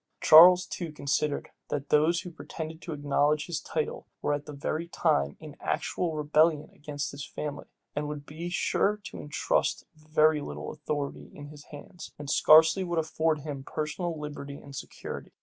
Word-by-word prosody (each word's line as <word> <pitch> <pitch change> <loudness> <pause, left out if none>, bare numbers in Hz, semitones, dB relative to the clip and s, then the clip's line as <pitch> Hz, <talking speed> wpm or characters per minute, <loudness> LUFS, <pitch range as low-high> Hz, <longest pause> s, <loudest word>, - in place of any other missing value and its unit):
Charles 180 +3 +9
too 170 -3 -5
considered, 150 0 -1 0.2
that 145 -1 -3
those 160 +3 +3
who 180 -2 -8
pretended 160 0 -7
to 170 - -7
acknowledge 145 +1 +1
his 170 -3 -3
title, 155 -1 -3 0.2
were 145 - +1
at 145 0 -4
that 150 - -7
very 155 +4 -3
time 70 - +1
in - - -10
actual 170 -3 -2
rebellion 155 0 +2
against 145 -1 -5
his 140 0 -7
family, 150 +1 -6 0.3
and 145 0 -2
would 145 -1 -6
be 165 +4 -6
sure 205 +3 +1
to - - -8
intrust 145 0 0
very 155 0 +2
little - - -6
authority 145 -2 -4
in 145 -1 -9
his 150 -1 -13
hands, 155 +4 -11
and 145 -1 -5
scarcely 160 +6 +6
would 175 -2 -2
afford 160 -1 0
him 140 -2 -6
personal 155 +3 -3
liberty 145 -1 -6
and 140 -1 -12
security. - - -7
150 Hz, 165 wpm, -28 LUFS, 145-160 Hz, 0.3 s, Charles